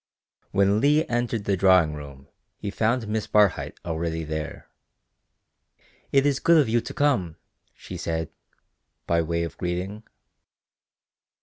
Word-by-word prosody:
When 100 +2 +2
Leigh 150 +3 +4
entered 120 -2 -1
the 100 - +2
drawing 90 -4 +4
room 70 -2 -10 0.3
he 100 - -5
found 115 +3 0
Miss 110 0 -2
Barhyte 105 -3 +2
already 80 -1 -2
there. 80 0 -5 1.4
"It 135 0 +4
is 140 -2 +2
good 170 0 +5
of 145 - +3
you 115 +1 +2
to - - -8
come," 125 - +1 0.4
she - - -9
said, 80 -1 -3 0.7
by 85 0 +2
way 85 +1 -1
of 85 -3 -7
greeting. 90 +4 -3
95 Hz, 130 wpm, -25 LUFS, 80-115 Hz, 1.4 s, good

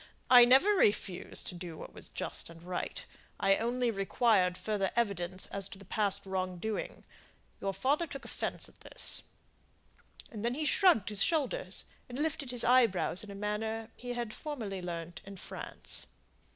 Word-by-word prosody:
"I 245 -1 +10
never 265 +11 +6
refused 205 - +1
to - - -2
do 175 -2 -7
what - - -9
was - - -10
just - - -3
and 165 0 -13
right. 180 0 -4 0.3
I 195 0 +4
only 240 +1 0
required 195 -2 +2
further 205 -3 -1
evidence 190 -5 -1
as 195 -1 -1
to - - -8
the 195 - -13
past 200 0 0
wrong 185 -1 -2
doing; 220 +4 -4 0.6
your 195 - -1
father 275 - +1
took 275 -2 -8
offence - - -2
at - - -16
this," - - -1 1.1
and 215 -2 -6
then 240 +1 0
he 305 +2 -2
shrugged 300 - +4
his 210 -2 +3
shoulders, 335 - -1 0.2
and 245 - -6
lifted 295 -2 -1
his 245 -1 +6
eyebrows 230 -7 +3
in 210 - -9
a 200 - -7
manner 220 +2 -3
he 245 0 -5
had 240 -3 -4
formerly 225 -11 -5
learnt 170 -1 -6
in 200 0 -10
France. - - -1
210 Hz, 165 wpm, -32 LUFS, 190-245 Hz, 1.1 s, I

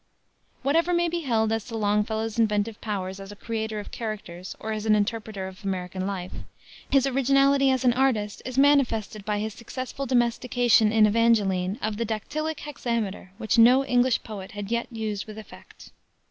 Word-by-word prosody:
Whatever 330 +6 +2
may 345 0 +2
be 345 +1 -2
held 225 -7 +1
as 225 -2 -1
to 230 -2 -5
Longfellow's 220 +1 0
inventive 210 0 0
powers 195 -3 -4
as 195 +1 -9
a - - -9
creator 220 0 -4
of 205 - -8
characters 195 -5 -6
or 220 - -4
an 215 0 +2
interpreter 210 -2 -2
of 190 +2 -12
American 185 -1 -3
life, 185 -2 -4 0.6
his 275 -1 +4
originality 275 +1 +3
as 260 0 +1
an 245 - +5
artist 235 -5 0
is 255 +1 -6
manifested 245 -7 +2
by 210 0 -1
his 215 +1 -3
successful 255 +4 -6
domestication 240 -2 +3
in 220 -1 +5
Evangeline 205 -4 +2
of 215 -1 -1
the 230 - -1
dactylic 300 +9 -3
hexameter, 230 -9 -3
which 225 0 +1
no 250 +4 +6
English 250 -1 +2
poet 200 -4 -8
had 205 +1 -6
yet 235 0 0
used 215 -3 -4
with 215 0 -9
effect. 220 - -13
220 Hz, 170 wpm, -25 LUFS, 205-250 Hz, 0.6 s, no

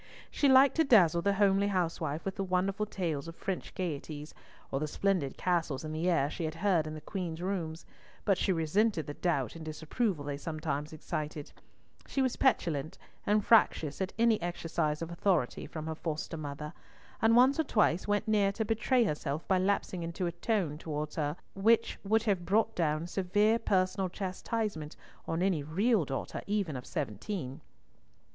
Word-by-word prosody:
She 285 - +3
liked 265 +3 +6
to 325 - +5
dazzle 180 - +5
the 200 +3 +2
homely 200 0 +3
housewife 165 -5 -1
with 195 - -2
the 195 - -2
wonderful 190 +3 0
tales 165 -7 -3
of 165 - -8
French 190 +1 -4
gaieties, 150 -3 -4 0.4
or 135 - 0
the 155 - -1
splendid 180 -4 0
castles 165 -6 0
in 155 - -4
the 165 +3 0
air 165 -6 +3
she 165 +3 -5
had 160 0 -3
heard 170 -3 +2
in 155 - -5
the 155 - -8
Queen's 170 -1 -4
rooms, 170 -3 -3 0.4
but 195 - +4
she 190 - 0
resented 170 +1 +1
the 145 - -5
doubt 145 -8 -1
and 165 - -8
disapproval 160 - -2
they 145 -1 -3
sometimes 155 -1 -3
excited; 150 -1 -5 0.6
she - - -3
was 260 -2 +2
petulant 165 - +1 0.3
and 210 0 +3
fractious 165 -9 +3
at 190 - -1
any 230 -3 +3
exercise 165 -2 -1
of 165 - -6
authority 170 -7 0
from 155 -1 -6
her 160 - -2
foster 160 +1 -4
mother, 150 0 -6 0.5
and 225 +1 +5
once 260 +5 +5
or - - +4
twice 210 - +2
went 205 +2 0
near 205 -2 +3
to 220 +2 -2
betray 235 +3 +2
herself 150 -4 -2
by 190 -1 +3
lapsing 185 -1 0
into 170 +2 -3
a 170 - 0
tone 175 -4 -1
towards 150 -2 -4
her 150 -1 -1 0.2
which 220 +4 +2
would 220 +2 +2
have 200 -6 +1
brought 220 +4 +2
down 155 -1 0
severe 205 +5 +2
personal 185 -2 +1
chastisement 190 -3 -3 0.3
on 165 +2 0
any 185 -6 +2
real 190 +6 +2
daughter 135 0 -4
even 200 -7 -1
of 125 - -7
seventeen. 135 - -4
175 Hz, 175 wpm, -31 LUFS, 155-205 Hz, 0.6 s, liked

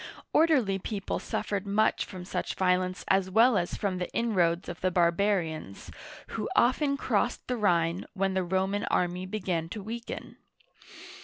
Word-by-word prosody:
Or 320 - +6
derly 215 - +2
people 200 -1 -3
suffered 200 -1 -3
much 215 +2 +2
from 185 -2 -9
such - - -3
violence 185 0 +1
as 190 -1 +2
well 225 +5 +5
as 175 -3 0
from 190 -3 -2
the 180 - -3
inroads 180 -7 +1
of 175 - -7
the 185 - +2
barbarians, 170 - 0 0.4
who - - -3
often 280 +3 +3
crossed - - 0
the 250 - 0
Rhine 175 -5 +1
when 195 0 0
the 190 0 +1
Roman 190 +3 0
army 180 +1 0
began 185 -5 -2
to 210 +2 -6
weaken. 230 +3 -7
190 Hz, 155 wpm, -28 LUFS, 180-210 Hz, 0.4 s, Or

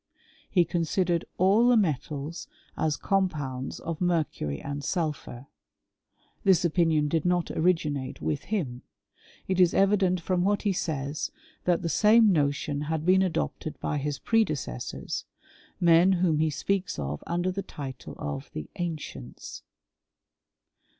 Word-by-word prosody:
Reconsidered 175 0 +1
all 200 +6 +5
the 245 -1 +6
metals 155 - -2 0.3
as 155 -3 0
compounds 145 -9 -1
of 165 0 -5
mercury 155 - 0
and 145 0 -5
sulphur: 150 -7 -3 1.0
this 190 -2 +4
opinion 160 -3 +2
did 160 +1 0
not 175 -1 +1
originate 150 -6 0
with 150 -1 -2
him. 140 - -2 0.7
It 185 -1 0
is 180 -2 +5
evident 195 -2 +3
from 180 +1 0
what 205 +2 +1
he 205 -2 +2
says, 150 -4 -2 0.4
that 175 -2 +2
the - - 0
same 215 +4 +5
notion 145 -2 0
had 160 0 -2
been 185 +1 +5
adopted 165 - -2
by 150 - -1
his 145 0 -2
predecessors 155 - -1 0.3
— - - -28
men 175 +2 +6
whom 175 -4 +2
he 160 0 +3
speaks 190 +5 -1
of 75 0 -4
under 175 +2 0
the 195 +2 -3
title 135 -8 -8
of 70 -2 -5
the 75 - -6
ancients. 165 - -6
165 Hz, 130 wpm, -27 LUFS, 145-185 Hz, 1.0 s, the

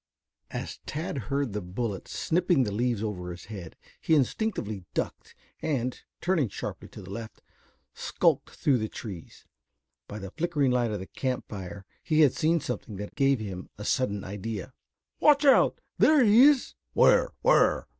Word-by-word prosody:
As - - -5
Tad 155 -2 -3
heard 140 -5 0
the 105 - -2
bullets 95 +2 -4
snipping 175 -4 +2
the 105 - -2
leaves 115 0 0
over 90 -5 -4
his 90 0 -8
head, 90 -6 -8 0.2
he 160 - +2
instinctively 130 - -1
ducked - - -4 0.3
and, 130 -5 -2 0.2
turning 165 - +1
sharply - - -6
to - - -11
the 90 - -11
left, 110 +1 -8 0.5
skulked - - +1
through 135 -4 +1
the 110 0 -2
trees. 95 -7 -9 0.6
By 105 - -7
the 95 -2 -7
flickering 155 -4 0
light 120 -2 +2
of 105 - -2
the 95 - -6
camp 130 +5 -3
fire 95 -1 -7 0.2
he 155 -1 +2
had 145 -4 +6
seen 165 +2 +2
something 120 -6 -5
that 105 +1 -7
gave 135 -2 +2
him 95 -4 -6
a 105 - -7
sudden 105 -6 0
idea. 105 +4 -5 0.5
"Watch 295 -1 +5
out. 275 - +5 0.2
There 300 -4 +6
he 225 +4 +7
is?" 290 -3 +4 0.2
"Where, - - +5
where?" - - +4
120 Hz, 165 wpm, -28 LUFS, 100-155 Hz, 0.6 s, he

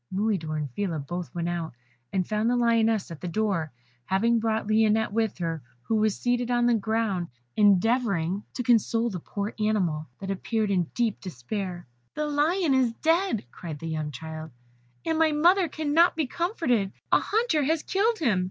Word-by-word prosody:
Mulidor 185 -6 -1
and 145 -3 -3
Phila 180 +2 -2
both 175 +5 -5
went 170 0 -2
out, 170 -5 -3 0.4
and 185 -2 0
found 215 +2 +1
the 245 - +2
Lioness 225 -4 +2
at 165 - -8
the 180 - -4
door, 180 -5 -1 0.3
having 230 +5 +2
brought 220 -1 0
Lionette 215 0 +2
with 220 -1 0
her, 165 -3 -3 0.2
who 225 - 0
was 215 -1 +1
seated 245 0 0
on 240 -1 +2
the 240 - +4
ground, 220 -4 0 0.3
endeavouring 200 -3 +3
to 250 - -2
console 230 -1 +2
the 185 - -4
poor 200 +5 -4
animal, 185 -8 0
that 195 0 -4
appeared 215 +2 -1
in 180 -3 +2
deep 235 -4 0
despair. 180 - -5 0.3
"The 300 - -1
Lion 300 +2 +2
is 255 -3 +2
dead," 325 - +1
cried 160 -4 -7
the 165 +3 -6
young 155 -1 -2
child, 160 +3 -7 0.6
"and 320 0 0
my 320 -1 +4
mother 350 +5 +4
cannot 315 +3 +3
be 315 -2 0
comforted 260 - 0 0.2
a - - +6
hunter 435 -8 +1
has 320 +2 +1
killed 440 +4 +1
him." 235 - +2
215 Hz, 175 wpm, -26 LUFS, 180-245 Hz, 0.6 s, a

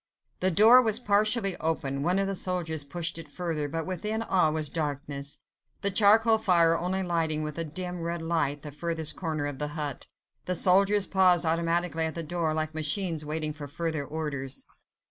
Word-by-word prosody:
The 185 - +3
door 220 +8 +7
was 220 -3 +2
partially 210 -3 +2
open; 140 -4 -2
one 180 +5 +1
of 195 - +1
the 195 - -2
soldiers 175 -5 -1
pushed 170 +3 -4
it 165 - -9
further, 160 -1 -3
but 165 +2 -3
within 210 +5 -3
all 180 -7 +2
was 155 -2 -3
darkness, 145 -2 -4 0.4
the 200 - +3
charcoal 220 +3 +5
fire 170 -6 +4
only 185 +3 -1
lighting 165 -3 0
with 150 +1 -5
a - - 0
dim, 180 +3 -6
red 170 0 -4
light 145 -4 -1
the 150 - -7
furthest 160 +1 -1
corner 155 -4 -3
of 145 -2 -5
the 150 +1 -4
hut. 145 -3 -4 0.4
The 180 - -1
soldiers 195 +3 +4
paused 180 -3 +3
automatically 165 0 0
at 160 - -3
the 165 - -3
door, 165 0 -2
like 155 0 -2
machines 160 +1 0
waiting 155 0 -2
for 145 -1 -8
further 160 0 -3
orders. 140 -3 -4
165 Hz, 185 wpm, -27 LUFS, 155-185 Hz, 0.4 s, door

